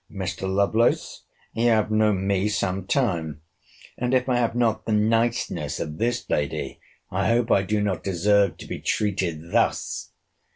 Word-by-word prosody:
Mr. 95 -1 -4
Lovelace, 100 +4 +1 0.3
you 115 +1 +1
have 110 -2 +2
known 105 -3 +2
me 100 +1 +1
some 95 -2 -2
time; 85 - -1 0.6
and, 125 +1 +1
if 125 0 +1
I 125 -2 +2
have 120 -1 0
not 115 -3 0
the - - 0
niceness 115 +2 0
of 75 -1 -5
this 120 +2 -1
lady, 75 -1 -2 0.3
I 95 +2 0
hope 115 +1 +2
I 100 - +5
do 105 +2 -1
not 100 -3 -2
deserve 100 +2 +2
to - - -10
be - - -6
treated 85 -6 -2
thus! - - 0
105 Hz, 160 wpm, -24 LUFS, 95-115 Hz, 0.6 s, I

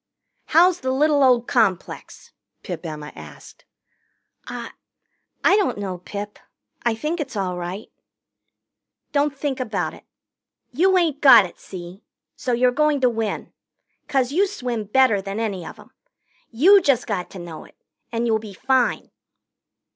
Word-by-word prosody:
"How's 355 +3 +4
the 260 - -3
little 290 +2 +2
old 245 -2 +4
complex?" 200 -7 -1 0.3
Pip - - -6
Emma 150 -1 -7
asked. - - -13 0.8
"I - - -6 0.7
I - - +5
don't 400 - 0
know, 190 -3 -4
Pip. 205 +3 -7 0.4
I 235 -2 0
think 305 +9 -3
it's 270 -5 -5
all 185 -3 -2
right." 180 +4 -6 1.2
"Don't 285 -1 0
think 275 -2 -3
about 195 -10 -2
it. - - -14 0.7
You 370 +8 +3
ain't 320 -5 0
got 265 -8 +8
it, 175 - -12
see? 180 +1 -10 0.3
So 255 - -3
you're 250 +1 +3
going 300 +2 +2
to 250 -1 +4
win. 225 -2 -4 0.5
'Cause 265 -2 +1
you 385 +7 +2
swim 245 - -4
better 220 -2 +3
than 195 +2 -5
any 200 -6 -3
of - - -9
'em. - - -17 0.6
You 370 - +6
just 275 -8 +2
got 190 -4 -3
to - - -11
know 170 -3 -8
it, - - -20 0.4
and 235 0 -1
you'll 220 -2 +2
be 210 -3 -10
fine." 260 +3 0
240 Hz, 150 wpm, -22 LUFS, 200-285 Hz, 1.2 s, got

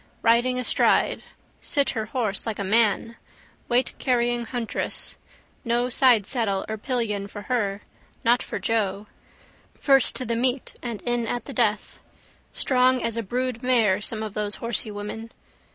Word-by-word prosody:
Riding 240 +2 +3
astride. 250 - +2 0.4
Sit 280 -2 +1
her 220 -3 -3
horse 225 -3 -1
like 220 - -2
a 200 - -2
man. 225 +2 +2 0.5
Weightcarrying 240 -1 +1
huntress. 240 -2 -3 0.5
No 240 +1 +1
sidesaddle 230 -5 +2
or 220 0 -4
pillion 215 -5 -1
for 205 0 -9
her, 205 -5 -1 0.4
not 240 +2 +4
for - - -5
Joe. 210 -3 -1 0.7
First 270 -3 +4
to 255 - -2
the 230 0 -1
meet 250 +2 0
and 235 -4 -5
in 240 -1 -1
at 245 - -3
the 275 - -7
death. 215 -3 0 0.5
Strong 255 -1 +3
as 230 -1 -1
a 230 - -1
brood 245 +2 -2
mare 225 -6 +3
some 220 0 0
of 215 -2 -5
those 210 -1 -1
horsey 230 -1 -3
women. 210 +2 -6
230 Hz, 145 wpm, -25 LUFS, 210-250 Hz, 0.7 s, not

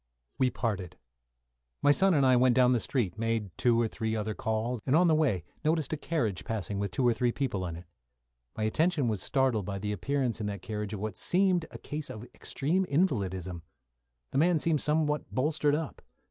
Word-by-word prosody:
We 130 - +4
parted. 100 -8 -3 0.9
My 145 - +6
son 190 +4 +4
and 140 -2 +4
I 130 -1 +5
went 125 0 +4
down 125 -1 +5
the 125 - +3
street, 110 -6 -2
made 115 -4 -1
two 120 -2 +3
or 115 - +2
three 110 0 -3
other 110 0 -2
calls, 110 +3 -2
and 135 - +2
on 175 +3 +5
the 165 - +4
way 135 - +2 0.2
noticed 155 -2 +1
a - - +2
carriage 125 - -2
passing 105 -3 -3
with 100 0 -1
two 125 +7 +1
or 120 - +4
three 120 +1 +1
people 105 -9 -2
in 85 - -5
it. 85 +2 -10 0.7
My 110 - -1
attention 150 +5 +2
was 105 -4 -1
startled 130 -8 +1
by 100 -1 -3
the 105 +1 -3
appearance 125 +3 -1
in 105 - -2
that 100 -3 -5
carriage 105 -1 -4
of 105 - -4
what 105 -2 -4
seemed 180 -2 +2
a - - -9
case 150 0 -5
of 110 - -7
extreme 170 +8 -1
invalidism. 95 - -1 0.7
The 135 - +1
man 170 +2 +4
seemed 155 -1 +1
somewhat 150 -1 +1
bolstered 150 +2 +1
up. 155 -1 -5
120 Hz, 200 wpm, -29 LUFS, 105-150 Hz, 0.9 s, My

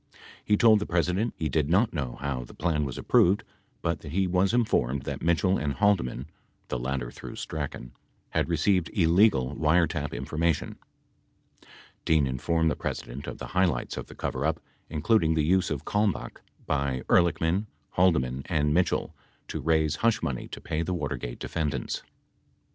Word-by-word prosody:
He 105 - +3
told 110 -1 +6
the 105 - -4
President 90 +6 0
he 80 - -1
did 75 0 0
not 100 +7 +3
know 70 -7 -3
how 70 -3 -2
the - - -13
plan 75 -3 0
was 65 - -5
approved 95 +4 +3 0.4
but - - 0
that 70 - -9
he 95 +1 +2
was 90 +1 +2
informed 70 - +1
that - - -5
Mitchell 85 +3 +2
and 75 -2 -1
Halde 100 +1 +3
man 65 +1 -5 0.4
(the 65 - -2
latter 65 -1 -3
through - - -9
Strachan) 70 -5 -5 0.4
had - - 0
received 85 +2 +2
illegal 85 - +3
wiretap 80 -2 +2
infor 65 +5 -5
mation. 85 -2 0 0.8
53 - - -24 0.4
Dean 80 -3 +3
informed 80 +5 +1
the - - -1
President 65 +4 -5
of - - -5
the - - -6
highlights 90 -10 +1
of - - -6
the - - -12
coverup, 75 +5 -1 0.3
including 80 +1 +2
the 80 - +2
use 95 +3 +2
of 75 -3 -4
Kalmbach 105 -2 -1 0.2
by 70 -2 -1
Ehrlichman, 85 +4 +2 0.2
Haldeman, 70 -8 +2
and 75 -4 +1
Mitchell 90 +2 +1 0.4
to 80 - -4
raise 80 -1 +2
hush 115 +4 +1
money 65 -3 -3
to - - -8
pay 80 -1 -2
the 90 +2 -2
Watergate 70 -6 -4
defendants. 75 -4 -3
80 Hz, 165 wpm, -27 LUFS, 70-90 Hz, 0.8 s, told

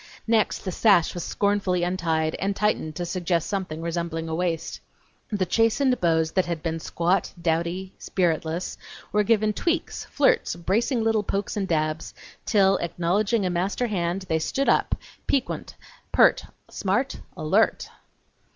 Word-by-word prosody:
Next 225 -2 +1
the 185 - -2
sash 185 -3 +4
was 175 - -4
scornfully 200 -3 0
untied 165 -3 0
and 195 +1 -1
tightened 205 -8 0
to 175 - -3
suggest 175 -2 -1
something 180 -5 -3
resembling 170 -1 -3
a 160 - -3
waist. 165 -1 -2 0.5
The 200 -4 0
chastened 230 +7 +2
bows 160 -2 +2
that 185 -2 +1
had 170 -3 -3
been 165 -1 -2
squat, 170 +4 0
dowdy, 170 +3 -1
spiritless, 170 -1 -1 0.3
were 210 - +3
given 215 0 +2
tweaks, 335 - -2
flirts, - - +2
bracing 220 +8 0
little 225 -1 +2
pokes 200 0 -2
and 200 -2 -1
dabs, 155 -1 -1 0.3
till, 195 -2 +4
acknowledging 185 +6 0
a 180 - 0
master 190 +7 0
hand, 185 -3 -1
they 160 -3 0
stood 275 +12 -1
up, - - +3 0.3
piquant, 275 -2 -1 0.4
pert, - - +4 0.2
smart, - - -1 0.2
alert! - - +2
180 Hz, 140 wpm, -25 LUFS, 170-210 Hz, 0.5 s, sash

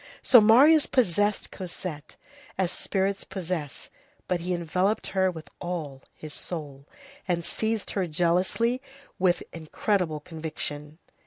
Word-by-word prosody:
So 245 -4 +8
Marius 280 +9 +7
possessed 205 -3 +1
Cosette, 170 -5 -7 0.4
as 185 -2 +1
spirits 195 +1 -1
possess, 170 -6 -5 0.4
but 180 - 0
he 175 +2 -3
enveloped 180 +4 0
her 190 -1 +2
with 160 -3 -8
all 155 -7 -4
his 155 -1 -9
soul, 145 -5 -6 0.4
and 170 -2 0
seized 220 -1 -1
her 190 -3 -1
jealously 180 +10 +1 0.4
with 180 -1 +2
incredible 165 0 -1
conviction. 155 -1 -6
180 Hz, 115 wpm, -27 LUFS, 160-195 Hz, 0.4 s, So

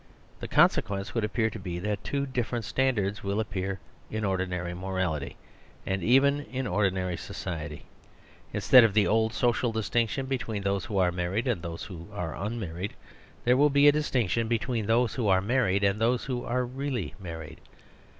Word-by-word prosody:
The - - -5
con - - +7
sequence 100 -1 -4
would 115 - 0
appear 110 +1 0
to 110 - -7
be 90 -2 -5
that 105 +3 -3
two 140 -1 -1
differ 125 -2 -2
ent 115 - -3
standards 110 -7 0
will 100 +2 -1
appear 95 -3 -3 0.3
in 110 0 -2
ordinary 90 -2 -1
moral 95 -1 -1
ity, 75 -2 -6 0.5
and 95 0 -1
even 135 +7 +4
in 130 0 -4
ordinary 95 -5 0
society. 80 -4 -6 0.7
Instead 125 -2 +7
of^ 110 -3 +3
the 105 -1 +4
old 110 +1 +2
social 120 -1 +1
distin 115 +1 +1
ction 135 +5 -3
between 120 -6 -3
those 100 -1 0
who 100 - -3
are 90 -2 +3
married 90 +6 -1
and 115 -9 0
those 85 -1 -6
who 85 -4 -9
are 90 -5 -4
unmarried, 100 -2 -4
t - - -20 0.5
here 125 +1 +5
will 145 +2 +5
be 140 +1 +5
a - - +9
distinction 120 -7 0
between 115 -1 -1
those 115 0 +2
wh - - -6
o 115 - +1
are 95 -1 +5
married 100 -2 +1
and 100 +2 +2
those 120 +2 +2
who 125 -2 -3
are 125 +1 0
really 130 -4 -3
married 80 -4 -8
105 Hz, 190 wpm, -28 LUFS, 95-120 Hz, 0.7 s, a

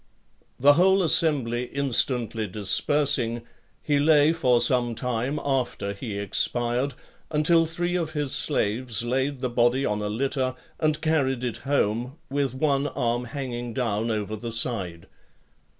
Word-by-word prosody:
The 145 +3 +6
whole 190 +4 +4
assembly 135 -8 +1
instantly 120 -4 0
(52) 105 +1 -8
dispersing, 120 +1 +2 0.4
he 145 -1 +1
lay 150 +1 +4
for 125 -7 +2
some 120 -2 +2
time 125 +4 -2
after 125 -7 -1
he 100 0 -6
expired, 120 +6 0 0.3
until 165 +2 +3
three 175 +2 -2
of 165 -3 -2
his 145 -3 -2
slaves 115 -3 -1
laid 130 +2 -1
the 130 - -1
body 120 +3 +2
on 105 0 -1
a 105 - -2
litter, 130 +3 -1 0.2
and 155 -1 +1
carried 135 -6 0
it 120 -2 -2
home, 125 -1 -1
with 140 -2 -1
one 140 0 +1
arm 120 -2 -1
hanging 120 -2 -5
down 115 -2 -1
over 110 -1 -2
the 115 +2 -6
side. 100 -8 0
125 Hz, 140 wpm, -25 LUFS, 115-145 Hz, 0.4 s, The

